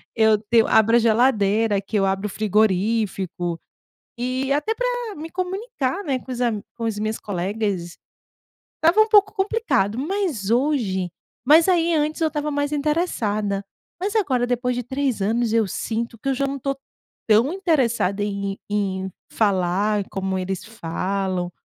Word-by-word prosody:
eu 220 -1 +4
te 225 +2 0
eu 225 - +5
abro 225 +2 +5
a - - +5
geladeira, 225 -2 +3
aqui 200 +2 -5
eu 195 - +2
abro 195 +2 0
o - - -7
frigorífico, 195 -4 0 0.6
e 255 +2 -2
até 365 +10 0
pra - - -1 0.3
me 320 +2 -7
comunicar, 375 - -3
né, 270 -4 0
com 260 - -8
os 245 - -5
am 230 -4 0
com 230 - -5
as 215 -2 -2
minhas 215 +1 -2
colegas, 195 -2 -3 0.8
estava 340 +7 +4
um 435 - +3
pouco 410 -1 +5
complicado, 385 - 0
mas 295 - -2
hoje 230 -9 +1 0.4
mas 320 +5 +7
aí 340 -2 +3
antes 305 +2 0
eu 320 - +4
estava 300 -1 -2
mais 285 0 -1
interessada. 220 - -1 0.3
Mas 400 +4 -2
agora, 260 - +2
depois 245 0 -1
de 245 - -2
3 265 -2 -2
anos 230 +2 +1
eu 225 -1 +3
sinto 230 +5 -3
que 275 - -2
eu - - +2
já 275 +2 0
não 275 0 -3
tô 275 +1 -2 0.5
tão 225 +7 +4
interessada 240 - +1
em 200 -1 -3
em 190 -2 -1 0.2
falar 200 0 +1
como 190 -1 -2
eles 185 0 -3
falam 185 -2 -3
230 Hz, 160 wpm, -22 LUFS, 200-290 Hz, 0.8 s, mas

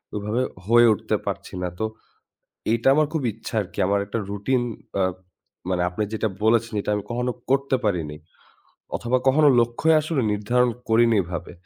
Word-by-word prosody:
ওইভাবে 105 +4 -1 0.2
হয়ে 120 +2 +6
উঠতে - - -2
পারছি - - -5
না। 90 - -1
তো, 110 - 0 0.9
এটা 115 +2 +2
আমার 155 +1 +3
খুব 160 - -1
ইচ্ছা 110 +2 -9
আরকি। 100 - -14
আমার 100 +1 +2
একটা 115 - -3
রুটিন 120 +5 0 0.4
আ - - +4 0.7
মানে 90 -1 +1
আপনি 90 +4 -3
যেটা 110 0 0 0.2
বলেছেন, 115 0 +2
এটা 105 - -3
আমি 105 - -3
কখনো 125 +1 -1 0.2
করতে 135 0 +2
পারিনি। 85 -8 -1 0.8
অথবা, 120 +2 0
কখনো 150 +3 +5
লক্ষ্যই 120 +8 +2
আসলে 155 -3 -1
নির্ধারণ 120 +4 +2 0.2
করিনি 115 0 +4
এভাবে। 85 0 -6
115 Hz, 160 wpm, -23 LUFS, 100-125 Hz, 0.9 s, হয়ে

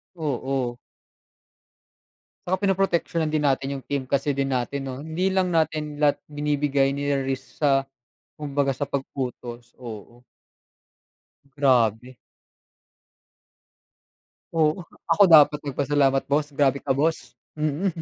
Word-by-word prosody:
Oo. 135 -5 -2 1.7
Tsaka 185 +1 +1
pinoproteksyonan 175 -4 +1
din 150 -1 0
natin 135 0 +1
yung 135 - -10
team 135 -2 -3
kasi 140 +1 +1
din 135 0 -1
natin 130 +2 -2
'no. 130 -1 -5
Hindi 170 +4 0
lang 190 -2 0
natin 155 -2 -1
lahat 145 -1 +4
binibigay 145 -2 0
niri-risk 140 0 -3
sa 135 -2 +3 0.5
kumbaga 145 -2 -1
sa 145 - -1
pag-utos, 125 -3 -5
oo. 120 +1 -10 1.3
Grabe. 125 -2 +2 2.4
Oo, 160 +2 +1 0.2
ako 205 - +5
dapat 150 -1 +7
nagpasalamat 140 -1 +1
boss, 145 +1 0
grabe 140 -1 +1
ka 140 - 0
boss. 155 +5 0 0.2
Mm. 155 +5 -1
140 Hz, 105 wpm, -24 LUFS, 135-150 Hz, 2.4 s, dapat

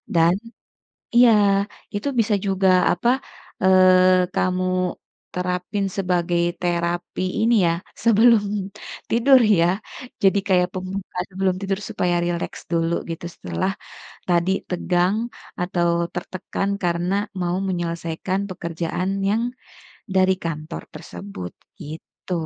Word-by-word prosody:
dan 165 +1 +5 0.8
iya 240 -1 +8 0.6
itu 205 +7 -2
bisa 220 -1 +2
juga 190 -1 +2 0.2
apa, 205 +7 +1 0.5
eee, 185 -1 +5
kamu, 185 0 +1 0.7
terapin 180 +2 -2
sebagai 175 -2 +1 0.2
terapi 175 0 -1 0.2
ini 230 +2 +3
ya 165 - +2 0.3
sebelum 230 -1 +5 0.7
tidur 255 +3 +6 0.2
ya 170 - +4 0.6
jadi 195 +1 +5
kayak 180 -2 +3
pembukaan 185 -1 -4
sebelum 190 0 0
tidur 195 0 -1
supaya 180 -5 0
rileks 175 -1 -3
dulu 165 0 +1 0.2
gitu 165 +1 -5
setelah, 90 - -2 0.6
tadi 175 +1 +2 0.2
tegang 180 +2 +1 0.4
atau 175 -1 0 0.3
tertekan 190 +2 -3
karena 175 +1 0 0.3
mau 175 +1 0
menyelesaikan 170 +1 -2
pekerjaan 175 +1 -3 0.2
yang, 215 +3 +1 0.7
dari 190 0 +4
kantor 155 - -4
tersebut 90 0 -8 0.3
gitu. 160 +4 -9
180 Hz, 105 wpm, -22 LUFS, 170-195 Hz, 0.8 s, iya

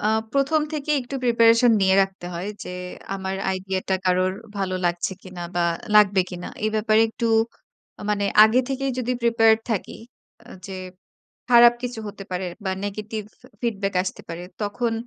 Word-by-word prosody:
অ্যা 210 - +1 0.2
১ম 280 +3 +2
থেকেই 300 0 0
একটু 250 +3 -8
প্রিপারেশন 230 0 +5
নিয়ে 190 0 +4
রাখতে 195 -2 -5
হয় 180 +4 -4 0.2
যে - - -7 0.4
আমার 190 0 -3 0.2
আইডিয়াটা 190 0 -2
কারোর 185 0 +2 0.3
ভালো 190 -1 -1
লাগছে 175 +2 0
কিনা 185 -2 -8
বা 175 -1 +1 0.3
লাগবে 205 -2 +6
কিনা। 180 -1 -6 0.2
এ - - +3
ব্যাপারে 215 0 +3
একটু, 230 +1 -3 0.8
মানে 205 -1 0 0.2
আগে 220 +4 +4
থেকেই 270 0 -1
যদি 250 0 -1
প্রিপেয়ার্ড 225 -1 +4
থাকি, 210 - -2 0.5
আ - - -21 0.2
যে 195 - -7 0.8
খারাপ 240 0 +8
কিছু 245 -2 -4
হতে 205 -1 -8
পারে 180 +1 -2 0.2
বা 190 - 0
নেগেটিভ 215 +1 -5 0.2
ফি 250 - -16 0.2
ফিডব্যাক 200 -4 -1
আসতে 185 - -5
পারে, 165 +1 -6 0.2
তখন 225 +3 -1
210 Hz, 160 wpm, -23 LUFS, 190-235 Hz, 0.8 s, খারাপ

